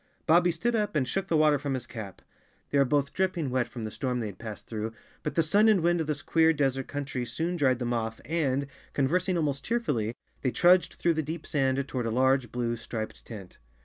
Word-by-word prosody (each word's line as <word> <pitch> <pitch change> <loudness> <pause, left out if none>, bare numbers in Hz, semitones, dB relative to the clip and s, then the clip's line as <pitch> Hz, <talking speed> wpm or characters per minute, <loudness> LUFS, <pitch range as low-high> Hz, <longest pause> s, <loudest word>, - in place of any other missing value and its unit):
Bobbie 175 +2 +5
stood 240 +7 -1
up 210 -6 0
and 135 -4 +1
shook 195 +7 -2
the 165 - +2
water 150 -2 +4
from 140 -1 -2
his 125 -2 -4
cap. 110 -5 -8 0.5
They 145 - +3
were 140 - +5
both 140 +1 +1
dripping 180 -7 0
wet 125 -1 +1
from 120 - -7
the 110 - -4
storm 125 0 -2
they 115 - -2
had 100 -3 -7
passed 110 -2 -7
through, 110 0 -4 0.3
but 150 - -4
the 165 - +4
sun 205 +8 +5
and 205 -5 +4
wind 175 0 +2
of 155 - -3
this 150 -2 -2
queer 160 0 +3
des¬ 135 -3 +1
ert 135 - -5
country 140 -3 -3
soon 160 +9 -2
dried 135 -6 +2
them 120 -1 -2
off 115 -1 -2
and, 140 -4 0 0.3
conversing 180 +6 +1
almost 145 -4 -1
cheerfully, 140 - -1 0.3
they 130 - +1
trudged 180 +7 +4
through 170 - +2
the 160 - 0
deep 155 +2 -5
sand 135 -1 0
toward 125 -4 -2
a - - 0
large 130 0 +2
blue, 120 -1 -1
striped 115 -1 -6
tent. 100 -6 -10
140 Hz, 230 wpm, -28 LUFS, 120-165 Hz, 0.5 s, Bobbie